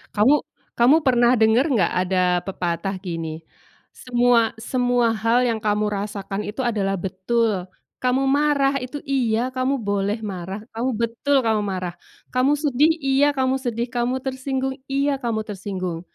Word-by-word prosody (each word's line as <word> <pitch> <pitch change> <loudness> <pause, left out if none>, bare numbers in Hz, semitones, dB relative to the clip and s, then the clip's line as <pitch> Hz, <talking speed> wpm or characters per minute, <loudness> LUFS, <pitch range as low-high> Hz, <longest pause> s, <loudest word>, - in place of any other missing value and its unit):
Kamu 225 +8 +5 0.4
kamu 245 +5 +5
pernah 245 -1 +4
denger 220 +4 +4
enggak 235 -8 +2
ada 185 -1 +2 0.2
pepatah 185 +1 -3
gini, 165 -3 -5 0.5
"Semua 240 -2 +2
semua 245 0 +1
hal 230 +3 +2
yang 225 -2 -1
kamu 210 0 +1
rasakan 205 -1 -3
itu 220 +5 -4
adalah 200 -4 0
betul. 190 +1 -1 0.3
Kamu 255 +1 +1
marah 280 0 +2
itu, 255 +3 -7
iya 250 -3 0
kamu 255 +1 0
boleh 205 +2 -1
marah, 190 0 -5
kamu 235 +3 -1
betul 235 +4 +1
kamu 220 -2 +2
marah. 185 -3 -3 0.4
Kamu 260 +3 +3
sedih, 295 +2 +2
iya 275 +2 +3
kamu 265 0 +1
sedih. 235 -2 -2
Kamu 250 +2 -1
tersinggung, 265 0 -2 0.2
iya 275 0 0
kamu 230 -4 -2
tersinggung, 185 -4 -5
235 Hz, 140 wpm, -22 LUFS, 205-260 Hz, 0.5 s, Kamu